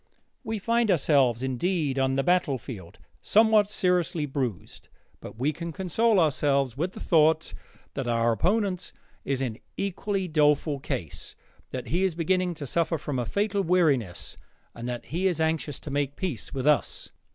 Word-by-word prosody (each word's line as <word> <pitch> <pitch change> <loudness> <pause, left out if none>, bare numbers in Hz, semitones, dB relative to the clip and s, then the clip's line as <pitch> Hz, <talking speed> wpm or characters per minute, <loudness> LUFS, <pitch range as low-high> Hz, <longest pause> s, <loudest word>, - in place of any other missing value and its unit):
We 220 0 -3
find 230 +2 +1
ourselves 135 - +3
indeed 140 +2 0
on 135 0 +1
the 135 - +1
battlefield 130 - -1 0.2
somewhat 215 -1 +4
seriously 180 -5 +1
bruised, 130 - -4 0.3
but - - -10
we 140 +6 0
can 170 +2 -5
console 195 +5 +2
ourselves 140 -5 +2
with 175 +6 -2
the - - -9
thought 160 -1 +3 0.4
that 135 - -3
our 115 0 +2
opponent 185 - 0 0.3
is 135 -1 0
in 120 -2 -4 0.2
equally 195 0 -2
doleful 150 -2 +2
case, 80 - -5 0.3
that 130 -1 -6
he 180 +3 +1
is 190 -4 +1
beginning 180 +1 0
to 150 - -6
suffer 165 +4 0
from 145 -3 -3
a 120 - -2
fatal 205 0 0
weariness, 150 - +1 0.4
and 120 +1 -6
that 120 -1 -5
he 180 +6 0
is 175 -4 0
anxious 160 -3 -1
to 145 - -7
make 140 0 -1
peace 170 - -4
with 135 -2 -3
us. 150 -1 +1
155 Hz, 160 wpm, -27 LUFS, 135-180 Hz, 0.4 s, somewhat